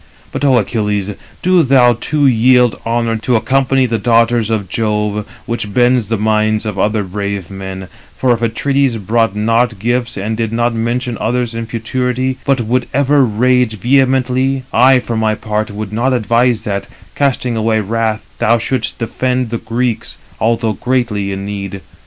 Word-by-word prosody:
But - - -4
Ο 135 -3 +4
Achilles, 105 -2 -1 0.3
do 185 -1 +4
thou 130 -4 +4
too 145 +5 -1
yield 125 -1 +4
honour 115 -1 0
to 120 +3 0
accompany 135 +2 +2
the 115 -2 -1
daughters 115 0 +2
of 110 -4 -1
Jove, 105 0 -1 0.2
which 115 -4 -3
bends 120 -3 +3
the 115 - 0
minds 110 +1 +1
of 105 -3 -4
other 105 +1 +1
brave 100 -1 -4
men; 95 -1 -7 0.3
for 125 -2 +2
if 115 - -3
Atrides 135 +2 0
brought 110 +1 0
not 115 +2 +1
gifts, 120 +4 -1
and 105 +3 -2
did 115 -1 -2
not 120 +1 0
mention 120 +1 -2
others 120 0 -1
in 115 0 -4
futurity, 125 +3 -2
but 135 -3 +2
would 120 +3 -1
ever 140 0 +3
rage 125 0 +1
vehemently, 130 +2 +1
I 130 +1 +6
for 120 -2 -3
my 110 -1 +1
part 105 0 -3
would 105 0 -6
not 125 +4 +1
advise 120 0 +1
that, 100 -1 -3 0.3
casting 130 -4 0
away 110 0 +1
wrath, 110 +1 -1
thou 115 +2 +3
shouldst 115 +1 -2
defend 125 +1 -1
the 115 - -2
Greeks, 115 +1 -3 0.2
although 115 -1 +1
greatly 110 -4 -1
in 95 0 -4
need. 100 -1 -5
115 Hz, 165 wpm, -15 LUFS, 110-125 Hz, 0.3 s, I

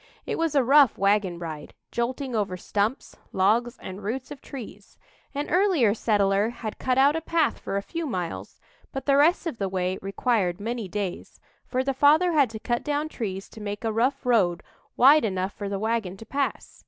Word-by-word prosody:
It - - -3
was 330 -2 0
a 275 - +5
rough 275 0 +5
wagon 200 -2 +2
ride, 160 -3 -7 0.2
jolting 250 +2 -2
over 200 -4 -1
stumps, 210 +7 -2 0.2
logs, 230 +6 +2
and 190 +2 -8
roots 245 +6 -4
of 285 -2 -9
trees. 210 -7 -10 0.4
An 290 +1 -2
earlier 350 - +3
settler 205 -1 +2
had 225 -2 -7
cut 255 -1 0
out 280 +3 +5
a 325 - -1
path 325 -1 +1
for 195 - -3
a 200 - -2
few 330 +5 -4
miles, 180 -9 -5 0.3
but 270 - -5
the 275 - +4
rest 315 +6 +4
of 315 -9 -4
the 195 -1 -1
way 185 0 -1
required 195 -2 0
many 230 0 -3
days, 195 -1 -5 0.3
for 255 0 0
the 275 +1 0
father 300 +6 +4
had 290 -6 +3
to 220 - -7
cut 240 +2 -2
down 295 +1 -1
trees 195 -8 -5
to 220 - -12
make 205 +1 -5
a 225 -1 -1
rough 255 +5 0
road 195 -9 +2 0.3
wide 285 +5 +7
enough 190 -2 -1
for 200 -1 -5
the 200 - -2
wagon 215 -3 -2
to 225 - -11
pass. 275 +4 -3
230 Hz, 195 wpm, -25 LUFS, 200-275 Hz, 0.4 s, wide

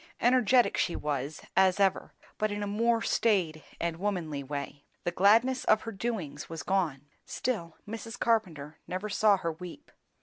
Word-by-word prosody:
Energetic 245 0 +4
she 175 - 0
was, 145 0 -3
as 190 0 +4
ever, 195 -2 +2 0.3
but 215 - +1
in 205 0 -3
a - - -1
more 230 +3 +1
staid 175 -9 +1 0.2
and 170 -1 -2
womanly 170 -7 -2
way; 140 +1 -6 0.2
the 175 - -1
gladness 225 +8 +4
of 215 0 +4
her 225 - -5
doings 190 -10 -4
was 165 -3 -6
gone. 160 -8 0 0.2
Still, 170 -10 -3
Mrs. 225 +2 -6
Carpenter 165 -10 0
never 185 +4 -4
saw 205 0 +4
her 170 -3 -2
weep. 180 - -10
190 Hz, 160 wpm, -29 LUFS, 160-220 Hz, 0.3 s, Energetic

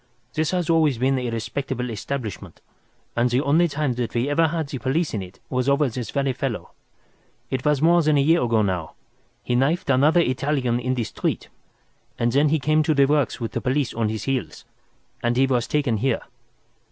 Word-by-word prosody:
This 155 0 0
has 180 -3 -1
always 160 -6 +3
been 130 +2 +1
a 125 -1 -2
respectable 125 +2 -3
establishment, 110 +1 -5 0.6
and 120 +1 +2
the 125 +2 +2
only 160 +5 +3
time 145 -4 -1
that 120 - -4
we 120 +1 +1
have 145 +2 -1
ever 165 - +5
had 160 -1 -2
the 135 -2 -5
police 145 +6 -1
in 105 - -2
it 95 +1 -11
was 130 +1 0
over 140 +1 +3
this 120 0 -5
very 140 -2 0
fellow. 130 -4 -4 0.8
It 130 -1 -2
was 150 -1 +2
more 170 +1 +5
than 155 -2 +2
a - - +4
year 165 +4 +3
ago 115 -3 +2
now. 90 -5 -2 0.5
He - - -2
knifed 140 +5 +1
another 150 +6 +4
Italian 130 -3 0
in 130 +1 -1
the 120 - -1
street, - - -3 0.7
and 120 0 +1
then 145 +4 +3
he 160 - +2
came 155 +2 +2
to 155 0 +1
the 140 -1 +5
works 145 0 +1
with 115 -2 -4
the - - -3
police 130 0 0
on 110 -2 0
his 110 -1 -4
heels, 125 - -3 0.6
and 120 0 0
he 135 - +5
was 125 -3 0
taken 140 -7 0
here. 130 +2 0
135 Hz, 205 wpm, -23 LUFS, 120-150 Hz, 0.8 s, ever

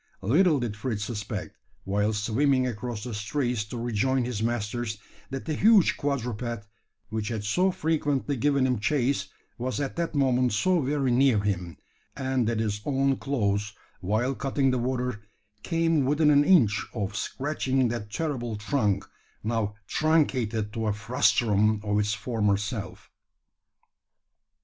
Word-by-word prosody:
Little 155 - +4
did 120 -4 -3
Fritz 105 -1 -3
suspect, 105 -2 -5 0.3
while 105 +2 +1
swimming 130 +6 +1
across 120 -2 -4
the 120 -1 -5
straits 120 +2 -1
to 115 +3 -7
rejoin 120 +2 0
his 120 -4 -3
masters, 115 -1 -2 0.3
that 135 -1 -5
the 160 - -2
huge 210 +3 +5
quadruped 120 -5 -3 0.4
which 110 -1 -3
had 110 -3 -3
so 180 - +2
frequently 150 -5 0
given 140 +1 +2
him 125 -4 +1
chase 140 +3 0 0.3
was 130 +3 -2
at 140 +1 -3
that 170 -2 -2
moment 130 -3 +2
so 180 - +2
very 135 -1 0
near 125 -3 +4
him; 90 -5 -2 0.4
and 130 -3 0
that 115 -1 0
his 105 -2 -1
own 135 0 +1
claws, 105 -6 -1 0.3
while 110 +7 0
cutting 135 0 0
the 130 - 0
water, 125 -2 -2 0.4
came 165 -1 +1
within 150 +3 +3
an 145 0 +6
inch 125 - +4
of 100 -2 -3
scratching 135 0 -1
that 110 -3 -4
terrible 120 -3 -3
trunk, 105 -3 0 0.4
now 110 -2 -1
truncated 125 -9 +1
to 110 -1 -2
a 105 - +1
frustrum 110 -1 +2
of 105 0 +1
its 105 +1 0
former 110 -5 0
self! 105 -2 -6
120 Hz, 145 wpm, -27 LUFS, 105-140 Hz, 0.4 s, an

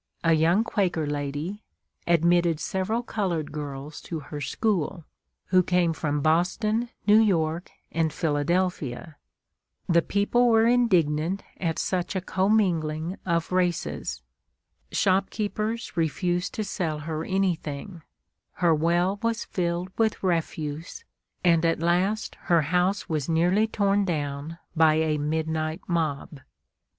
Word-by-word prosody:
a 165 -1 +4
young 165 +7 +3
Quaker 185 -8 0
lady, 145 +7 -3 0.5
admitted 170 -1 +3
several 190 +8 -1
colored 180 -10 -2
girls 145 0 -6
to 165 - -5
her 145 0 -7
school, 175 +1 -1 0.4
who 185 0 +5
came 180 -2 +2
from 150 -2 -1
Boston, 200 +9 +1 0.2
New 210 +1 +6
York, 170 -5 +1 0.2
and 165 -1 +1
Philadelphia. 155 -2 -1 0.7
The 170 -1 +4
people 225 +7 +2
were 225 -1 +5
indignant 185 -7 +2
at 165 -3 -2
such 185 +1 -1
a - - +1
commingling 180 -4 0
of 170 0 0
races. 170 - -1 0.7
Shopkeepers 210 +4 0
refused 175 +2 -1
to 215 - -1
sell 165 -6 -2
her 155 +1 -3
anything; 175 -3 -2 0.5
her 170 -2 +3
well 175 +5 +1
was 230 0 -1
filled 175 0 -2
with 220 -2 +1
refuse, 165 - -2 0.4
and 170 -2 +4
at 165 -1 +2
last 180 +6 +1
her 170 -4 +4
house 180 +5 +1
was 155 -3 -2
nearly 180 +7 +3
torn 200 -2 +1
down 150 -1 -3 0.2
by 160 -1 +5
a 155 -1 +1
midnight 155 +2 -2
mob. 155 -4 -2
170 Hz, 120 wpm, -26 LUFS, 155-195 Hz, 0.7 s, New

